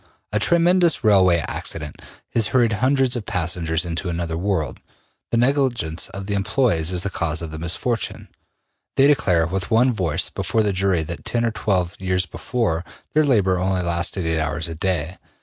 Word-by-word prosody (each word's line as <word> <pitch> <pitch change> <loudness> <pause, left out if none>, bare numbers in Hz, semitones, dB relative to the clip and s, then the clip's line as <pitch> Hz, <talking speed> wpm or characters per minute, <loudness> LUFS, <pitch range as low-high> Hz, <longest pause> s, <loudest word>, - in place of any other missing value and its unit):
A 105 - +2
tremendous 170 - +3
railway 95 -6 +4
accident 75 -3 -5 0.3
has 115 -2 +2
hurried 120 -2 +2
hundreds 130 +3 +2
of 115 -4 -5
passengers 85 -3 -1
into 85 +2 -3
another 85 -1 -3
world. 85 -6 -2 0.5
The 115 - 0
negligence 120 - 0
of 100 0 -7
the 100 - -2
employes 100 - +1
is 90 -1 -1
the 100 - -2
cause 85 -2 -1
of 80 - -6
the 80 - -6
misfortune. 100 +8 -2 0.7
They 135 - +5
declare 90 - +3
with 90 +2 -3
one 120 +2 +3
voice 85 -5 -1
before 95 +3 0
the 105 -2 +1
jury 95 -3 +1
that 85 +2 -7
ten 120 +1 0
or 115 - +1
twelve 95 -4 -1
years 95 -1 0
before, 85 - -2 0.3
their 155 - +4
labor 100 -10 +2
only 95 0 0
lasted 85 +1 0
eight 80 0 0
hours 80 +1 -1
a 85 - -5
day. 90 0 -2
95 Hz, 175 wpm, -22 LUFS, 85-115 Hz, 0.7 s, They